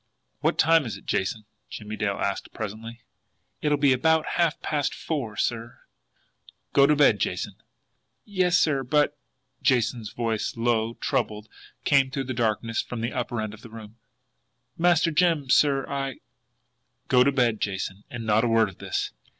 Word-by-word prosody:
"What -, -, 0 dB
time 160 Hz, -3 st, +4 dB
is 100 Hz, -3 st, -5 dB
it, -, -, -17 dB
Jason?" 105 Hz, +3 st, -2 dB, 0.2 s
Jimmie 105 Hz, 0 st, -7 dB
Dale 100 Hz, -2 st, -1 dB
asked 100 Hz, -1 st, -3 dB
presently. 115 Hz, +2 st, -7 dB, 0.6 s
"It'll 150 Hz, -1 st, +2 dB
be 140 Hz, -2 st, +4 dB
about 160 Hz, +4 st, +2 dB
half 170 Hz, -1 st, +1 dB
past 145 Hz, -2 st, -1 dB
four, 125 Hz, -10 st, -4 dB
sir." 115 Hz, 0 st, -3 dB, 0.9 s
"Go 140 Hz, -, +6 dB
to 150 Hz, -, +4 dB
bed, 140 Hz, -8 st, +4 dB
Jason." -, -, -2 dB, 0.7 s
"Yes, 185 Hz, -3 st, +2 dB
sir; 145 Hz, -5 st, +2 dB
but" 145 Hz, +3 st, +2 dB, 0.5 s
Jason's 120 Hz, -4 st, +1 dB
voice, 115 Hz, -1 st, -2 dB
low, 115 Hz, -1 st, 0 dB
troubled, 105 Hz, 0 st, -2 dB, 0.4 s
came 135 Hz, -2 st, +3 dB
through 135 Hz, +1 st, -3 dB
the 130 Hz, 0 st, -4 dB
darkness 115 Hz, -1 st, 0 dB
from 120 Hz, -2 st, -6 dB
the 115 Hz, +2 st, -2 dB
upper 120 Hz, -2 st, -3 dB
end 110 Hz, -1 st, -3 dB
of 110 Hz, -, -13 dB
the 115 Hz, -, -12 dB
room 110 Hz, 0 st, -11 dB, 0.8 s
"Master 175 Hz, 0 st, +3 dB
Jim, 160 Hz, -5 st, +2 dB
sir, 140 Hz, -2 st, +3 dB
I 135 Hz, -1 st, -3 dB, 0.5 s
" -, -, -49 dB
"Go 125 Hz, -1 st, +5 dB
to 140 Hz, -, +3 dB
bed, 120 Hz, -5 st, +1 dB
Jason 95 Hz, 0 st, -3 dB
and 120 Hz, -2 st, -6 dB
not 110 Hz, +1 st, +3 dB
a -, -, +2 dB
word 115 Hz, -2 st, +3 dB
of 95 Hz, -, -15 dB
this." -, -, -3 dB
120 Hz, 165 wpm, -25 LUFS, 110-145 Hz, 0.9 s, Go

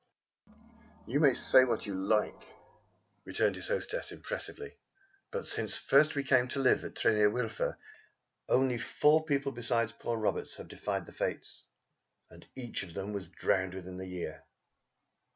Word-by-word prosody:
"You 135 Hz, +5 st, 0 dB
may 140 Hz, -5 st, +5 dB
say 130 Hz, -, +6 dB
what 120 Hz, -4 st, -1 dB
you 100 Hz, -, -4 dB
like," 100 Hz, +3 st, 0 dB, 0.8 s
returned -, -, +1 dB
his -, -, -6 dB
hostess -, -, -2 dB
impressively, 445 Hz, -3 st, -6 dB, 0.5 s
"but 475 Hz, 0 st, -4 dB
since -, -, +1 dB
first 150 Hz, +3 st, +4 dB
we 140 Hz, -, 0 dB
came 130 Hz, -2 st, +3 dB
to 135 Hz, -, -3 dB
live 135 Hz, -, +3 dB
at -, -, -8 dB
Tryn 115 Hz, -, +3 dB
yr 105 Hz, 0 st, +5 dB
Wylfa 115 Hz, 0 st, -2 dB, 0.7 s
only 130 Hz, -2 st, +3 dB
four 155 Hz, +6 st, +3 dB
people 140 Hz, -3 st, 0 dB
besides 115 Hz, -2 st, 0 dB
poor 120 Hz, -1 st, -4 dB
Roberts 110 Hz, -, -1 dB
have -, -, -10 dB
defied -, -, -3 dB
the -, -, -13 dB
Fates, -, -, -4 dB, 0.6 s
and -, -, -14 dB
each 125 Hz, -3 st, -4 dB
of 90 Hz, -4 st, -8 dB
them 100 Hz, +2 st, -4 dB
was 95 Hz, -4 st, -5 dB
drowned 95 Hz, 0 st, 0 dB
within 90 Hz, -1 st, -8 dB
the 95 Hz, 0 st, -6 dB
year. 90 Hz, -4 st, -6 dB
120 Hz, 155 wpm, -31 LUFS, 100-140 Hz, 0.8 s, say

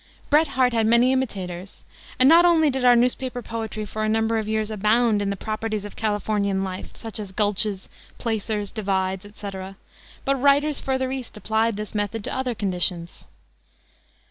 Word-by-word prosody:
Bret 310 Hz, +2 st, +5 dB
Harte 255 Hz, -2 st, +1 dB
had 225 Hz, -1 st, +2 dB
many 235 Hz, +3 st, +5 dB
imitators, 190 Hz, -7 st, -4 dB, 0.3 s
and 255 Hz, -, +5 dB
not 335 Hz, +4 st, +8 dB
only 325 Hz, -4 st, +4 dB
did 260 Hz, -1 st, -2 dB
our 245 Hz, -1 st, +7 dB
newspaper 250 Hz, +1 st, 0 dB
poetry 220 Hz, -1 st, -5 dB
for 215 Hz, +2 st, -4 dB
a 215 Hz, -, +1 dB
number 225 Hz, +1 st, +1 dB
of 215 Hz, -, -4 dB
years 220 Hz, 0 st, -1 dB
abound 215 Hz, +1 st, +2 dB
in 200 Hz, -, -1 dB
the 200 Hz, -, -1 dB
properties 215 Hz, 0 st, -3 dB
of 205 Hz, -, -9 dB
Californian 205 Hz, -2 st, 0 dB
life, 185 Hz, 0 st, -6 dB
such 225 Hz, -3 st, -5 dB
as 205 Hz, -3 st, -6 dB
gulches, 205 Hz, 0 st, 0 dB, 0.3 s
placers, 215 Hz, -3 st, -2 dB
divides, 190 Hz, -2 st, -2 dB
etc., 195 Hz, -2 st, -8 dB, 0.5 s
but 275 Hz, -1 st, 0 dB
writers 285 Hz, +1 st, +3 dB
further 260 Hz, -1 st, -1 dB
east 260 Hz, -5 st, -6 dB
applied 220 Hz, 0 st, 0 dB
his 210 Hz, 0 st, -6 dB
method 210 Hz, +1 st, -2 dB
to -, -, -4 dB
other 260 Hz, -2 st, -2 dB
conditions. 180 Hz, -4 st, -2 dB
220 Hz, 170 wpm, -23 LUFS, 205-245 Hz, 0.5 s, not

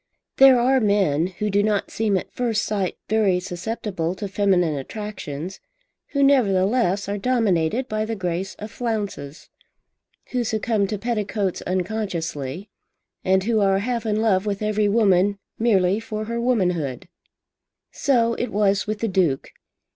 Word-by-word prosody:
There 265 Hz, -2 st, +8 dB
are 260 Hz, +2 st, +3 dB
men, 195 Hz, -, +2 dB
who 205 Hz, +3 st, -3 dB
do 200 Hz, +1 st, +3 dB
not 210 Hz, -1 st, 0 dB
seem 215 Hz, -3 st, +1 dB
at -, -, -6 dB
first 230 Hz, -3 st, 0 dB
sight 200 Hz, -4 st, -2 dB
very 205 Hz, -4 st, +2 dB
susceptible 185 Hz, -1 st, -4 dB
to 205 Hz, +2 st, -5 dB
feminine 190 Hz, -5 st, +2 dB
attractions, 185 Hz, 0 st, -6 dB, 0.5 s
who 280 Hz, -1 st, 0 dB
nevertheless 205 Hz, -5 st, +2 dB
are 200 Hz, 0 st, -2 dB
dominated 225 Hz, -2 st, +1 dB
by 215 Hz, -1 st, -1 dB
the 225 Hz, +1 st, -3 dB
grace 185 Hz, 0 st, -3 dB
of 210 Hz, +1 st, -8 dB
flounces, 205 Hz, -, -4 dB, 0.8 s
who 250 Hz, -1 st, 0 dB
succumb 220 Hz, -2 st, 0 dB
to 210 Hz, -, -3 dB
petticoats 205 Hz, -3 st, -2 dB
unconsciously, 180 Hz, -4 st, -3 dB, 0.5 s
and 190 Hz, 0 st, +2 dB
who 225 Hz, +1 st, +1 dB
are 195 Hz, -1 st, +3 dB
half 235 Hz, +3 st, -2 dB
in 210 Hz, 0 st, +1 dB
love 205 Hz, -2 st, +2 dB
with 200 Hz, 0 st, -2 dB
every 210 Hz, -1 st, +1 dB
woman 200 Hz, -2 st, +3 dB, 0.2 s
merely 200 Hz, -4 st, +3 dB
for 215 Hz, -1 st, -5 dB
her 235 Hz, +1 st, -3 dB
womanhood. 180 Hz, -, 0 dB, 0.8 s
So 235 Hz, -5 st, +2 dB
it 245 Hz, -, -3 dB
was 200 Hz, -1 st, +1 dB
with 215 Hz, 0 st, -3 dB
the 230 Hz, -, +1 dB
Duke. 180 Hz, -9 st, 0 dB
205 Hz, 145 wpm, -23 LUFS, 185-225 Hz, 0.8 s, There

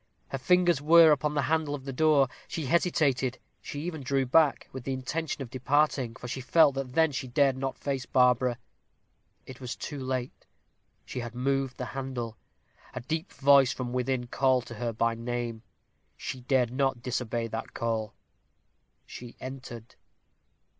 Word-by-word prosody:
Her 135 Hz, -, -4 dB
fingers 175 Hz, +1 st, +3 dB
were 165 Hz, +1 st, +7 dB
upon 150 Hz, +1 st, +1 dB
the 145 Hz, -, +1 dB
handle 155 Hz, -2 st, 0 dB
of 135 Hz, -2 st, -10 dB
the 135 Hz, -, -4 dB
door. 145 Hz, -1 st, +4 dB, 0.2 s
She 160 Hz, -, -4 dB
hesitated: 135 Hz, -5 st, +1 dB, 0.2 s
she 145 Hz, -, -6 dB
even 160 Hz, -2 st, -4 dB
drew 135 Hz, 0 st, 0 dB
back, 145 Hz, +3 st, +3 dB
with 130 Hz, -2 st, -7 dB
the 135 Hz, -, -2 dB
intention 140 Hz, +3 st, -3 dB
of 120 Hz, -, -11 dB
departing, 135 Hz, -2 st, +1 dB
for 125 Hz, -, -8 dB
she 130 Hz, +2 st, -4 dB
felt 150 Hz, +2 st, +5 dB
then 135 Hz, -1 st, -4 dB
that 160 Hz, -1 st, +3 dB
she 130 Hz, 0 st, -3 dB
dared 135 Hz, +1 st, +3 dB
not 135 Hz, 0 st, -3 dB
face 135 Hz, -3 st, -3 dB
Barbara. 125 Hz, -1 st, +3 dB, 0.9 s
It 130 Hz, 0 st, -11 dB
was 125 Hz, -2 st, -4 dB
too 145 Hz, -2 st, -6 dB
late 130 Hz, -1 st, -4 dB, 0.6 s
she -, -, -5 dB
had 120 Hz, 0 st, -6 dB
moved 135 Hz, 0 st, -1 dB
the 125 Hz, -, -4 dB
handle. 130 Hz, -4 st, -5 dB, 0.6 s
A -, -, -4 dB
deep 160 Hz, +8 st, -3 dB
voice 135 Hz, -3 st, +5 dB
from 125 Hz, -1 st, -5 dB
within 125 Hz, 0 st, -1 dB
called 130 Hz, 0 st, +1 dB
to -, -, -9 dB
her 120 Hz, +1 st, -3 dB
by 115 Hz, +1 st, +1 dB
name. 115 Hz, -1 st, -4 dB, 0.6 s
She 130 Hz, -, -6 dB
dared 125 Hz, -1 st, +1 dB
not 130 Hz, -2 st, 0 dB
disobey 120 Hz, -2 st, -2 dB
that 110 Hz, +1 st, -6 dB
call 110 Hz, -2 st, -2 dB, 0.9 s
she 120 Hz, -1 st, -10 dB
entered. 125 Hz, -3 st, -8 dB
130 Hz, 165 wpm, -28 LUFS, 125-145 Hz, 0.9 s, were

